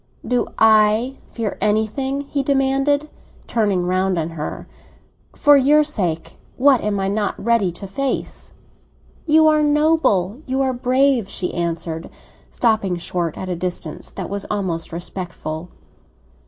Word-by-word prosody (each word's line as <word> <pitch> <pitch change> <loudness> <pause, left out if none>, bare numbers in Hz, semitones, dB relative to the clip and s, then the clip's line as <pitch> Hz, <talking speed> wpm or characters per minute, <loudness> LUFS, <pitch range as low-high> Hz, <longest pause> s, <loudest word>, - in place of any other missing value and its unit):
"Do 245 -1 +1
I 220 +4 +4
fear 225 -4 -4
anything?" 220 +6 0
he 285 0 -2
demanded, 275 +2 +1 0.4
turning 205 -6 0
round 185 0 +1
on 165 0 -2
her. 155 -2 -6 0.7
"For 290 -1 +6
your 290 +3 +5
sake 180 - -3 0.2
what 265 -1 +5
am 205 -1 -1
I 195 - 0
not 205 +1 -1
ready 230 -5 +1
to 195 - -8
face?" 265 +8 -3 0.7
"You 315 +1 +5
are 305 -1 +4
noble—you 295 - +1
are 265 -1 +1
brave!" 255 -2 +2
she 180 - -3
answered, 170 -1 -3 0.4
stopping 220 -6 +1
short 170 -1 -3
at 190 - -5
a 180 - -2
distance 175 -2 -5
that - - -6
was 200 -1 -4
almost 185 -5 -2
respectful. 170 -1 -5
215 Hz, 130 wpm, -20 LUFS, 180-270 Hz, 0.7 s, For